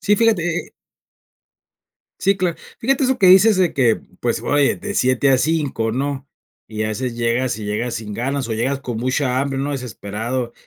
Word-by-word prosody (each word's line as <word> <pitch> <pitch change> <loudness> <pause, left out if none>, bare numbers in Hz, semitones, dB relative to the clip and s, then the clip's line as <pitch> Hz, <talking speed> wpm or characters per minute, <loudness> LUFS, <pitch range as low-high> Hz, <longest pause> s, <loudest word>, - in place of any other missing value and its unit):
Sí, 205 +1 +2
fíjate, 225 -6 +3
eh 175 0 -1
eh - - -20 1.5
sí, 195 +1 +2
cla 180 -3 -1 0.2
fíjate 270 +3 +1
eso 260 0 +1
que 190 - +4
dices 190 +3 +7
de 180 -3 +2
que, 120 -5 +2 0.2
pues, 120 -2 -1
oye, 145 -1 +2
de 205 -1 -6
7 130 +2 +2
a 130 - +4
5 145 -8 0
¿no? 140 +1 -3 0.4
Y 110 0 -3
haces 115 +3 -3
llegas 120 +1 0
y 105 - -6
llegas 115 +3 -2
sin 105 -2 -5
ganas, 135 +1 -2
o 110 - -1
llegas 135 +5 -1
con 120 -4 -5
mucha 130 +1 0
hambre, 135 -1 -2
¿no? 145 +2 -2
Desesperado, 120 -1 -4
130 Hz, 185 wpm, -20 LUFS, 120-165 Hz, 1.5 s, dices